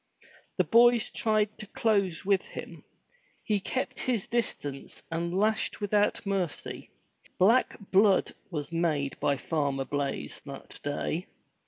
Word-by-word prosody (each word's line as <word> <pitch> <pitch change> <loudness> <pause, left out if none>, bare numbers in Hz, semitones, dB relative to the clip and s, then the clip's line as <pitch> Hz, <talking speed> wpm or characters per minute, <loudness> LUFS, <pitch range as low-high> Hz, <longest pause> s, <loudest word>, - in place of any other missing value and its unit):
The - - +4
boys 235 0 +5
tried 215 -1 +1
to 215 - -7
close 200 -6 +1
with 195 -1 +3
him. - - -9 0.6
He 210 -2 +1
kept 255 +6 -3
his 235 -6 0
distance 145 - -3
and 170 +1 -1
lashed 215 +4 +1
without 205 0 +1
mercy. 190 -5 -3 0.5
Black 225 +8 +4
blood 195 0 +4 0.2
was 150 -4 -4
made 155 -5 0
by 140 - +1
Farmer 140 -3 -1
Blaize 140 -1 -3
that 140 0 -9
day! 150 +4 -2
190 Hz, 125 wpm, -29 LUFS, 150-215 Hz, 0.6 s, boys